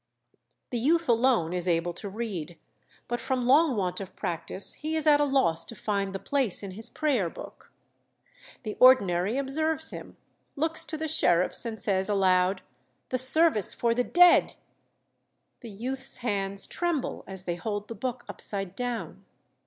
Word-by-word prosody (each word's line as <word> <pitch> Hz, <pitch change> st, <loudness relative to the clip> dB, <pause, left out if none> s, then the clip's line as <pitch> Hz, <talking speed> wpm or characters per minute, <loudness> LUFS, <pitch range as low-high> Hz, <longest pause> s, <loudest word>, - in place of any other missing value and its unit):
The 240 Hz, -, -2 dB
youth 330 Hz, +7 st, +1 dB
alone 230 Hz, -8 st, +2 dB
is 180 Hz, 0 st, -1 dB
able 170 Hz, 0 st, 0 dB
to 200 Hz, +4 st, -7 dB
read, 190 Hz, -6 st, -6 dB, 0.5 s
but 240 Hz, 0 st, -3 dB
from 255 Hz, -2 st, -2 dB
long 280 Hz, +2 st, +4 dB
want 185 Hz, -3 st, -2 dB
of 190 Hz, -, -9 dB
practice 170 Hz, +3 st, -3 dB
he 310 Hz, +1 st, -5 dB
is 315 Hz, -1 st, -1 dB
at 295 Hz, -1 st, +5 dB
a -, -, +3 dB
loss 265 Hz, -, +1 dB
to 230 Hz, -, -10 dB
find 200 Hz, -2 st, -2 dB
the 195 Hz, -, -4 dB
place 255 Hz, -3 st, -1 dB
in 195 Hz, -, -6 dB
his 215 Hz, +4 st, -3 dB
prayer 260 Hz, -, 0 dB
book. -, -, -12 dB, 0.9 s
The 215 Hz, -3 st, -5 dB
ordinary 205 Hz, -4 st, +4 dB
observes 315 Hz, +3 st, -1 dB
him, -, -, -10 dB, 0.4 s
looks 320 Hz, +2 st, +1 dB
to 315 Hz, -, -5 dB
the 315 Hz, +1 st, -3 dB
sheriffs, 180 Hz, -, +3 dB
and 220 Hz, -2 st, -5 dB
says 190 Hz, -1 st, 0 dB
aloud, 185 Hz, -1 st, +2 dB, 0.5 s
'The 255 Hz, -, -1 dB
service 260 Hz, -, +4 dB
for 235 Hz, -1 st, +1 dB
the 245 Hz, +1 st, 0 dB
dead!' 355 Hz, +5 st, +4 dB, 1.0 s
The 235 Hz, -, -10 dB
youth's 260 Hz, +6 st, -3 dB
hands 200 Hz, -5 st, -1 dB
tremble 345 Hz, -6 st, -3 dB
as 190 Hz, -1 st, -7 dB
they 175 Hz, -, -3 dB
hold 205 Hz, +2 st, -5 dB
the -, -, -6 dB
book 245 Hz, +3 st, -5 dB
upside 195 Hz, -2 st, -2 dB
down. 245 Hz, -1 st, -5 dB
230 Hz, 160 wpm, -27 LUFS, 190-270 Hz, 1.0 s, at